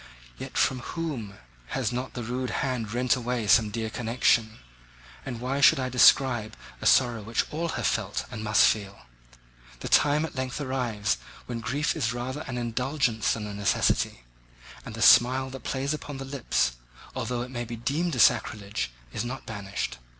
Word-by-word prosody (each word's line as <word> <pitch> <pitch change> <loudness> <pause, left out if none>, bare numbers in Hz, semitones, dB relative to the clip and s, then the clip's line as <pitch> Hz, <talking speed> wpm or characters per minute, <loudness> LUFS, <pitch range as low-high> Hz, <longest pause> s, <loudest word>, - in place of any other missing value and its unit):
Yet - - -6
from 130 - +2
whom 125 -8 -5 0.4
has 125 -4 0
not 125 +2 -4
that 120 - -4
rude 125 +2 -3 0.2
hand 120 -5 -2
rent 125 +2 +2
away 125 -2 -2
some 110 +1 +5
dear 110 +1 -4
connection? 115 -1 +1 0.7
And 120 -3 -4
why 130 +3 -2
should 145 +2 +6
I 130 -1 -1
describe 125 -3 +4 0.2
a - - +1
sorrow 120 -3 +4
which 115 +3 -1
all 165 +2 -2
have - - -2
felt, 105 -2 -1
and 110 -3 -6
must 105 0 +4
feel? 100 -5 0 0.8
The - - -4
time 150 +2 +4
at 160 - -8
length 130 0 -3
arrives 120 - -1 0.3
when 120 -2 -4
grief 140 +6 -1
is 125 -7 -1
rather 130 +4 -4
an 125 -2 -4
indulgence 125 -1 0
than 110 -2 -4
a 105 - -6
necessity; 100 -10 0 0.6
and - - -8
the - - -1
smile 130 +2 +6
that 135 -1 -8
plays 135 +2 -2
upon 145 -2 -6
the 135 - -6
lips, 120 - -1 0.4
although 120 -1 -2
it 125 - -9
may 120 -2 -3
be 120 0 -6
deemed 140 +8 -1
a - - -3
sacrilege, 105 - +2 0.2
is - - -2
not 130 +2 -6
banished. 100 - -5
125 Hz, 175 wpm, -27 LUFS, 110-130 Hz, 0.8 s, should